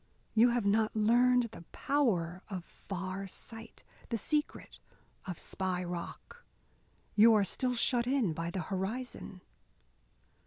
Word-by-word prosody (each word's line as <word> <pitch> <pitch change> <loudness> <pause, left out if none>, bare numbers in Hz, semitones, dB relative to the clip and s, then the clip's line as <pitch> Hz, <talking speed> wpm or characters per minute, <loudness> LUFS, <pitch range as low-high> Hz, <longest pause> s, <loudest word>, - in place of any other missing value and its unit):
You 230 +2 +6
have 240 -3 0
not 215 +2 +2
learned 240 +2 +4
the 170 - -10
power 185 -12 0
of 185 -4 -5
far 190 +1 -5
sight, 225 +3 -11 0.3
the 230 - 0
secret 300 +7 -2 0.5
of 180 -3 -4
Spy 185 -1 -2
Rock. 175 - -7 0.7
You 220 +1 +7
are 210 - +4
still 250 +6 -1
shut 240 0 +2
in 250 - +2
by 165 +2 -3
the 180 +1 -3
horizon." 195 +2 -4
215 Hz, 125 wpm, -32 LUFS, 185-245 Hz, 0.7 s, You